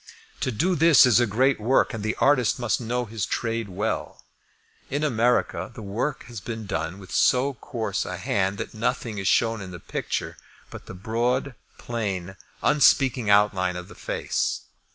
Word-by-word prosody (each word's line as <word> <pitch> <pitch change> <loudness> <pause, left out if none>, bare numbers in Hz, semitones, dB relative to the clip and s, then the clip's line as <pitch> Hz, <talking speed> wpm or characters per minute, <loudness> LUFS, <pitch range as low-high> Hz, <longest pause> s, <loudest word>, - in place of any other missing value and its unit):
To 130 - -1
do 170 - +1
this 165 -4 +7
is 125 -2 +5
a 120 - +3
great 130 +6 +2
work, 125 +4 +2
and 110 -2 -5
the 110 0 -1
artist 130 -5 +3
must 120 -1 0
know 120 +1 -1
his 110 -2 -5
trade 115 +1 -2
well. 105 +4 -3 0.7
In 145 +3 -1
America 120 -4 +1
the 110 - -8
work 115 +8 -3
has 120 -3 -8
been 110 0 -6
done 80 0 -3
with 95 -2 -12
so 135 +2 +3
coarse 110 -5 -3
a - - -5
hand 95 0 0
that - - -5
nothing 115 -1 -2
is 95 - -2
shown 115 -2 +2
in 95 - -7
the 90 -1 -8
picture - - -4 0.3
but - - -10
the - - -8
broad, 120 +7 -1 0.2
plain, 95 -6 -4 0.3
unspeaking 130 -5 +4
outline 100 -3 +3
of 90 +1 -7
the - - -11
face. - - -2
115 Hz, 175 wpm, -25 LUFS, 100-125 Hz, 0.7 s, this